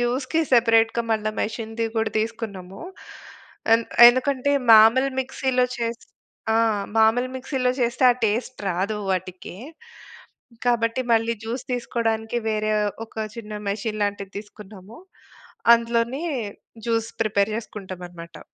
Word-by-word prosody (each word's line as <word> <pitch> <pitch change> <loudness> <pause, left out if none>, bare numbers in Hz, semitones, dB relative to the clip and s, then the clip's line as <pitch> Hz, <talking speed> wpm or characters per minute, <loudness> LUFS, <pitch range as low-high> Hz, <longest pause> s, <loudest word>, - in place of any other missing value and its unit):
జ్యూస్‌కి 260 +6 0
సెపరేట్‌గా 230 -1 +4
మళ్ళా 215 -1 0
మెషిన్‌ది 225 +1 -3
కూడా 220 0 0
తీసుకున్నాము. 215 -4 -5 0.9
ఎంద్ 230 0 0 0.2
ఎందుకంటే, 260 +2 +1 0.2
మామూలు 225 +5 +7
మిక్సీలో 255 -1 0
చేసి 230 0 -4 0.5
ఆ! - - +3 0.4
మామూలు 225 +3 +3
మిక్సీలో 255 -1 -1
చేస్తే, 240 +2 +1
ఆ - - -8
టేస్ట్ 235 +5 -2
రాదు 195 +5 -2
వాటికి. 185 -1 -4 1.1
కాబట్టి, 235 +1 +1
మళ్ళీ 225 0 +2
జ్యూస్ 235 +3 -4
తీసుకోడానికి 230 -1 -1
వేరే 215 0 0 0.3
ఒక - - -26 0.2
చిన్న 215 -2 -8 0.2
మెషీన్ 215 +1 -3
లాంటిది 200 -1 -4
తీసుకున్నాము. 205 +1 -12 0.8
అందులోనే 235 +5 -1 0.6
జ్యూస్ 230 -1 0
ప్రిపేర్ 210 -1 0
జేసుకుంటామనమాట. 180 -6 -9
225 Hz, 105 wpm, -23 LUFS, 215-240 Hz, 1.1 s, మామూలు